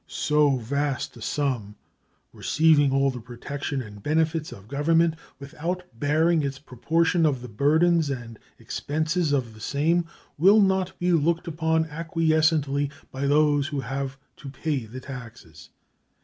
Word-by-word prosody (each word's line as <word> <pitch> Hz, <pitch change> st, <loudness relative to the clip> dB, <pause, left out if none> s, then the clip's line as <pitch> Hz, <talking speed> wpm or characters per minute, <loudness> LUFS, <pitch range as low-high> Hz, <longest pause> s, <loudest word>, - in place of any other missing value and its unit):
So 150 Hz, -2 st, +2 dB
vast 140 Hz, +3 st, -2 dB
a 120 Hz, -, -12 dB
sum, 120 Hz, -6 st, -2 dB, 0.6 s
receiving 155 Hz, -3 st, +3 dB
all 135 Hz, 0 st, +2 dB
the 125 Hz, -2 st, -8 dB
protection 135 Hz, +3 st, -5 dB
and 105 Hz, -2 st, -12 dB
benefits 155 Hz, +3 st, 0 dB
of 100 Hz, +1 st, -12 dB
Government 160 Hz, +5 st, +2 dB, 0.2 s
without 165 Hz, +6 st, -4 dB, 0.2 s
bearing 160 Hz, +4 st, +2 dB
its 140 Hz, -1 st, -3 dB
proportion 165 Hz, +6 st, 0 dB
of 135 Hz, -5 st, +1 dB
the -, -, -6 dB
burdens 155 Hz, +7 st, +2 dB
and 120 Hz, -4 st, -6 dB, 0.2 s
expenses 155 Hz, +2 st, -1 dB
of 125 Hz, -5 st, 0 dB
the 110 Hz, -, -15 dB
same, 160 Hz, +8 st, +1 dB, 0.3 s
will 195 Hz, +6 st, +6 dB
not 190 Hz, -2 st, +1 dB
be 180 Hz, 0 st, 0 dB
looked 165 Hz, +2 st, +1 dB
upon 160 Hz, 0 st, +1 dB
acquiescently 155 Hz, -3 st, +1 dB, 0.2 s
by 135 Hz, +1 st, -2 dB
those 145 Hz, -1 st, +3 dB
who 145 Hz, -3 st, -3 dB
have 135 Hz, 0 st, -4 dB, 0.2 s
to 140 Hz, -, -9 dB
pay 135 Hz, -4 st, -3 dB
the 130 Hz, +4 st, -8 dB
taxes. 115 Hz, -, -11 dB
145 Hz, 140 wpm, -25 LUFS, 135-160 Hz, 0.6 s, will